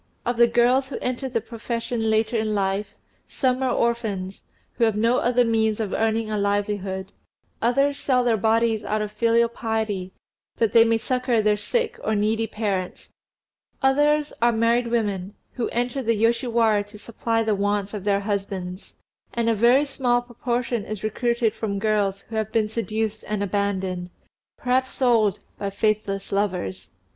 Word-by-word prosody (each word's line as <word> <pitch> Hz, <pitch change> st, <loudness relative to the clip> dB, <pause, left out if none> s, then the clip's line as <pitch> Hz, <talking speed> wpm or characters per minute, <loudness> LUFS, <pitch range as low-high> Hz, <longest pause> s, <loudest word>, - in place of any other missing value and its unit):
Of 240 Hz, 0 st, -1 dB
the 235 Hz, 0 st, +6 dB
girls 245 Hz, +3 st, +3 dB
who 270 Hz, -, -4 dB
enter 255 Hz, +1 st, -3 dB
the 230 Hz, -, -1 dB
profession 230 Hz, 0 st, -3 dB
later 220 Hz, +2 st, +1 dB
in 215 Hz, -1 st, 0 dB
life, 195 Hz, +1 st, -1 dB, 0.3 s
some 255 Hz, -1 st, 0 dB
are 260 Hz, -, +1 dB
orphans, 215 Hz, -5 st, -1 dB, 0.3 s
who -, -, -1 dB
have 220 Hz, -2 st, +1 dB
no 230 Hz, +4 st, +2 dB
other 245 Hz, 0 st, +3 dB
means 220 Hz, -1 st, +1 dB
of 210 Hz, -3 st, -2 dB
earning 220 Hz, 0 st, 0 dB
a 210 Hz, -, 0 dB
livelihood; 200 Hz, -1 st, -1 dB, 0.5 s
others 275 Hz, +4 st, +2 dB
sell 250 Hz, -2 st, +2 dB
their 235 Hz, -2 st, +3 dB
bodies 225 Hz, +1 st, +2 dB
out 210 Hz, +1 st, -1 dB
of 210 Hz, -, -5 dB
filial 230 Hz, +2 st, +3 dB
piety, 220 Hz, -5 st, -3 dB, 0.4 s
that 225 Hz, -2 st, +1 dB
they 230 Hz, -, +8 dB
may 230 Hz, 0 st, +2 dB
succour 250 Hz, 0 st, 0 dB
their 210 Hz, -1 st, +3 dB
sick 445 Hz, -, -2 dB
or 220 Hz, -, 0 dB
needy 220 Hz, +2 st, +1 dB
parents; 195 Hz, -5 st, -3 dB, 0.7 s
others 295 Hz, +2 st, +3 dB
are 240 Hz, 0 st, +5 dB
married 235 Hz, +1 st, +2 dB
women, 205 Hz, -4 st, -1 dB, 0.2 s
who 245 Hz, -, -3 dB
enter 245 Hz, +3 st, -1 dB
the 230 Hz, -2 st, +1 dB
Yoshiwara 230 Hz, -1 st, +2 dB
to 210 Hz, +1 st, -13 dB
supply 225 Hz, +1 st, -1 dB
the 220 Hz, -1 st, +1 dB
wants 205 Hz, 0 st, -1 dB
of 205 Hz, -3 st, -5 dB
their 200 Hz, -1 st, +1 dB
husbands; 195 Hz, -2 st, -4 dB, 0.4 s
and 230 Hz, -1 st, +2 dB
a -, -, +3 dB
very 240 Hz, +6 st, +4 dB
small 245 Hz, -3 st, 0 dB
proportion 240 Hz, -1 st, -2 dB
is 215 Hz, -1 st, -6 dB
recruited 235 Hz, +1 st, 0 dB
from 200 Hz, -3 st, -3 dB
girls 200 Hz, -2 st, 0 dB
who 225 Hz, -, -10 dB
have 220 Hz, -1 st, -1 dB
been 220 Hz, -2 st, +2 dB
seduced 220 Hz, 0 st, -2 dB
and 210 Hz, -1 st, -1 dB
abandoned, 190 Hz, -3 st, -2 dB, 0.5 s
perhaps 255 Hz, +1 st, +1 dB
sold, 230 Hz, -6 st, +2 dB, 0.2 s
by 200 Hz, -, -2 dB
faithless 200 Hz, -1 st, -1 dB
lovers. 180 Hz, -, -2 dB
220 Hz, 165 wpm, -24 LUFS, 205-235 Hz, 0.7 s, they